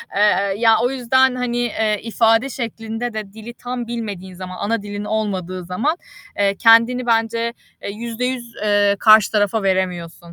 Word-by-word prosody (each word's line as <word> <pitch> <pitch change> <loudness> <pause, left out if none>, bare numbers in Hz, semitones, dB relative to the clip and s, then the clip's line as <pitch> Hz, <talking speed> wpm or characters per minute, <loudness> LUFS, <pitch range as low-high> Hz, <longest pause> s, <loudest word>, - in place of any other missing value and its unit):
Eee, 200 -1 +2
ya, 225 0 +4
o 245 - +2
yüzden, 260 0 +2
hani, 250 -1 -2
eee, 220 -3 0
ifade 225 +2 +2
şeklinde 230 -1 -5
de 210 -2 -6
dili 220 +2 -10
tam 245 0 -6
bilmediğin 205 -6 -6
zaman, 185 0 -8
ana 225 +1 -1
dilin 205 0 -6
olmadığı 190 -4 -3
zaman, 225 - -1 0.4
eee, 200 -1 +1
kendini 230 +3 +4
bence, 230 0 0 0.3
eee, - - -4
%100 235 +2 -4
eee, 205 -1 +3
karşı 215 -2 +6
tarafa 210 0 +1
veremiyorsun. 185 -3 -1
220 Hz, 150 wpm, -19 LUFS, 200-235 Hz, 0.4 s, karşı